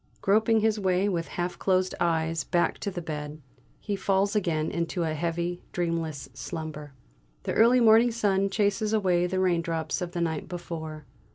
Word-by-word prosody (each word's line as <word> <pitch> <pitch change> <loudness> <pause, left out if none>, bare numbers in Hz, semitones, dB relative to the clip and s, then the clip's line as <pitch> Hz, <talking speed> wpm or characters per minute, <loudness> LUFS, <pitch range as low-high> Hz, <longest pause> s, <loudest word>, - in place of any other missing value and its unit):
Groping 220 +2 +3
his 220 0 +2
way 190 0 +2
with 170 -4 -1
half 175 0 -4
closed 185 -1 +1
eyes 165 -2 0
back 175 - 0
to 205 - -2
the 175 -3 -6
bed, 150 -1 -5 0.4
he 205 - -3
falls 195 +1 +1
again 165 -6 0
into 170 +1 -2
a 160 -1 -1
heavy, 170 +2 -2
dreamless 165 -5 -2
slumber. 150 +4 -6 0.5
The - - -2
early 240 +3 +5
morning 225 +1 +6
sun 200 -3 +1
chases 210 +1 0
away 180 -4 +2
the 185 +1 -1
raindrops 170 -2 0
of 175 -1 -4
the 175 - -2
night 160 -3 -2
before. 160 -4 -6
175 Hz, 165 wpm, -27 LUFS, 165-200 Hz, 0.5 s, morning